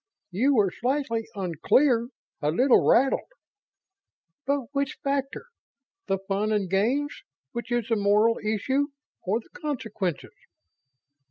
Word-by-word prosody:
"You 260 +10 +2
were 200 -5 +3
slightly 245 -2 -1
unclear 230 - +2 0.3
a 150 - +1
little 250 - +4
rattled? 265 +3 +3 1.2
But 280 0 +2
which 280 -1 -1
factor 275 - -2 0.6
the 195 - +1
fun 195 +2 -2
and 205 -3 +1
games, 240 +11 0 0.3
which 235 +1 -6
is 240 -2 0
the 225 - +3
moral 210 +2 +3
issue, 260 +7 0 0.3
or 210 +6 -1
the - - -24
consequences?" 220 - -4
230 Hz, 115 wpm, -26 LUFS, 200-270 Hz, 1.2 s, little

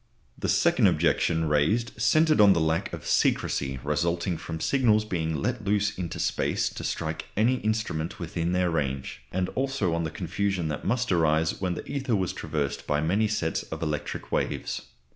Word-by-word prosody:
The - - -3
second - - +4
objection 80 -1 +2
raised 90 +11 +2
centred 155 +2 +4
on 100 -2 +8
the 85 - +1
lack 80 +1 0
of - - -7
secrecy 65 -2 +1
resulting 85 +4 0
from 80 0 -6
signals 110 - +3
being 80 -5 -2
let 120 - -2
loose 100 +1 +1
into 90 -3 -4
space - - 0
to - - -8
strike 80 -1 -3
any 120 +5 +3
instrument 110 -6 -2
within 85 -1 -2
their 90 -1 +1
range; 70 -5 -2
and 90 0 0
also 130 -9 -1
on 85 0 0
the 80 - -2
confusion 90 +1 -2
that 75 - -4
must 125 +2 0
arise 80 -1 +2
when 90 -2 0
the - - -6
ether 135 -4 -1
was 95 -3 -1
traversed 70 -2 -3
by 75 0 +1
many 95 +8 +2
sets 105 0 -1
of - - -6
electric 75 -2 -4
waves. - - -2
90 Hz, 175 wpm, -27 LUFS, 80-105 Hz, -, on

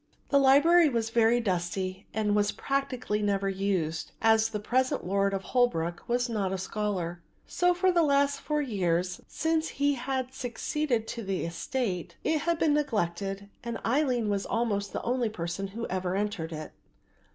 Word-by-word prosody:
The 280 - +5
library 295 +5 +6
was 230 -3 -1
very 230 +1 +4
dusty 185 -1 -2
and 210 -1 0
was 205 0 +2
practically 255 -6 -2
never 200 -1 +1
used, 190 -5 -1
as 225 0 +4
the 210 - -3
present 255 +5 0
lord 195 +2 +1
of 195 -1 -2
Holwick 175 -7 0
was 245 +1 +1
not 205 -5 -1
a 190 - -1
scholar; 185 -3 -3 0.2
so 355 0 +2
for 370 +1 +3
the 345 -1 +3
last 280 -2 +2
four 300 -1 0
years 180 -6 -1
since 320 0 0
he 285 0 +3
had 260 0 -3
succeeded 255 -1 -2
to 235 - -4
the 190 -3 -2
estate 180 0 -3
it 315 - +1
had 340 +1 +1
been 315 -2 +3
neglected 200 - -1 0.2
and 235 -1 -3
Aline 250 -2 +1
was 200 -1 -1
almost 205 -4 -1
the - - -4
only 245 -1 0
person 175 -1 -4
who 230 +4 -5
ever 185 0 -2
entered 200 -5 -2
it. 155 -1 -6
220 Hz, 165 wpm, -28 LUFS, 190-265 Hz, 0.2 s, library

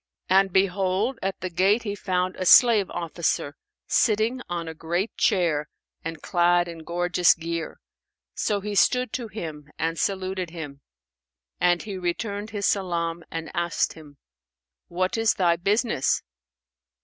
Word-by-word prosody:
And 195 0 +5
behold, 195 +5 +1
at 195 0 -3
the 185 - -3
gate 195 +7 +2
he 205 -3 -3
found 185 -2 -1
a 185 - -4
slave 225 -4 +7
officer 165 -3 -2 0.3
sitting 225 +4 +2
on 170 -1 -3
a 160 - -5
great 175 +6 -2
chair 170 -10 +1 0.3
and 165 -2 -6
clad 175 -1 +3
in 170 -1 -8
gorgeous 175 +1 +2
gear; 165 0 -5 0.5
so 205 -2 -1
he 210 +1 -4
stood 250 +4 +2
to 240 -3 -3
him 155 -9 -7
and 165 0 -1
saluted 190 -2 -2
him; 150 -5 -8 0.8
and 175 -1 +2
he 200 -3 -6
returned 200 +4 -3
his 205 -2 -3
salam 170 -3 -1
and 165 -1 -5
asked 170 0 0
him, 150 -3 -14 0.7
"What 185 +5 -1
is 225 -1 +3
thy 175 -3 +3
business?" 200 - +1
180 Hz, 140 wpm, -25 LUFS, 170-200 Hz, 0.8 s, slave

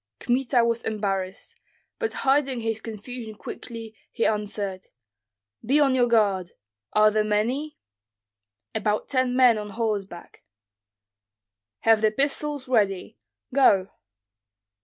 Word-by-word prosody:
Kmita 245 -1 +2
was 235 0 0
embarrassed, 195 -4 -3 0.4
but 450 -2 -1
hiding 270 -2 +2
his 225 -1 -2
confusion 225 +1 -7
quickly, 225 +1 -8 0.2
he 230 - -1
answered, 205 -3 -2 0.8
"Be 275 +6 +3
on 275 -3 +4
your 250 -2 +3
guard. 200 -6 +2 0.4
Are 215 0 +5
there 215 0 +2
many?" 240 +9 -1 1.0
"About 210 0 -1
ten 255 -2 +1
men 250 -4 +5
on 210 0 -6
horseback." 205 -5 -4 1.4
"Have 225 -1 +4
the 215 - +4
pistols 285 +3 -1
ready. 200 - 0 0.3
Go!" 200 -8 +4
225 Hz, 110 wpm, -25 LUFS, 210-255 Hz, 1.4 s, Are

